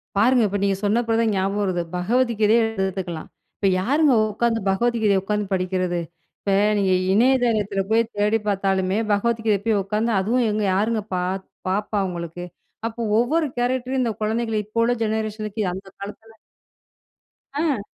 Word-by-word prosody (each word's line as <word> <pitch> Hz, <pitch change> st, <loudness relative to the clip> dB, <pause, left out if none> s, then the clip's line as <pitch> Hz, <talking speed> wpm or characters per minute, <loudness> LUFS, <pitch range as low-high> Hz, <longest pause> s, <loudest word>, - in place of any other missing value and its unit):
பாருங்க 240 Hz, +4 st, +4 dB
இப்ப 205 Hz, +1 st, -2 dB
நீங்க 200 Hz, -1 st, +2 dB
சொன்ன 210 Hz, +3 st, +2 dB
பிறகு 225 Hz, 0 st, +2 dB
தான் 225 Hz, -, +2 dB
ஞாபகம் 195 Hz, +2 st, 0 dB
வருது. 185 Hz, -3 st, 0 dB
பகவத் 235 Hz, +8 st, +1 dB
கீதைய 220 Hz, +2 st, +4 dB, 0.2 s
எடுத்துக்கலாம். 180 Hz, -4 st, -4 dB, 0.3 s
இப்ப 200 Hz, -, +1 dB
யாருங்க 285 Hz, +6 st, +3 dB, 0.2 s
உட்கார்ந்து 225 Hz, +1 st, 0 dB
பகவத் 235 Hz, +5 st, +1 dB
கீதைய 200 Hz, -2 st, +3 dB
உட்கார்ந்து 210 Hz, 0 st, -1 dB
படிக்கிறது? 185 Hz, -1 st, -1 dB, 0.4 s
இப்ப 200 Hz, -, -2 dB, 0.3 s
நீங்க 195 Hz, -1 st, +2 dB, 0.2 s
இணையதளத்தில் 220 Hz, -4 st, +2 dB
போய் 230 Hz, +1 st, +4 dB
தேடி 210 Hz, +2 st, +2 dB
பார்த்தாலுமே, 195 Hz, -1 st, +1 dB
பகவத் 225 Hz, +2 st, +1 dB
கீதைய 205 Hz, -3 st, +2 dB
போய் 215 Hz, -3 st, +2 dB
உட்கார்ந்து 215 Hz, +4 st, -1 dB
அதுவும் 230 Hz, +5 st, +1 dB
எங்க 210 Hz, 0 st, -1 dB
யாருங்க 215 Hz, +3 st, +1 dB
பார்ப்பா 190 Hz, +3 st, -2 dB
உங்களுக்கு. 175 Hz, 0 st, -6 dB, 0.4 s
அப்போ 230 Hz, +1 st, -6 dB, 0.2 s
ஒவ்வொரு 310 Hz, +7 st, +2 dB
கேரக்டர் 255 Hz, +1 st, 0 dB
இந்த 235 Hz, -2 st, +1 dB
குழந்தைகள 225 Hz, +1 st, -1 dB
இப்போ 215 Hz, +3 st, -3 dB
உள்ள 235 Hz, -, +2 dB
ஜெனரேஷன் 215 Hz, -1 st, -2 dB
க்கு, 220 Hz, -, -2 dB
அந்த 190 Hz, +2 st, -8 dB
காலத்தில 220 Hz, +3 st, -10 dB, 1.2 s
அ. 285 Hz, -8 st, -1 dB
210 Hz, 150 wpm, -22 LUFS, 195-230 Hz, 1.2 s, பாருங்க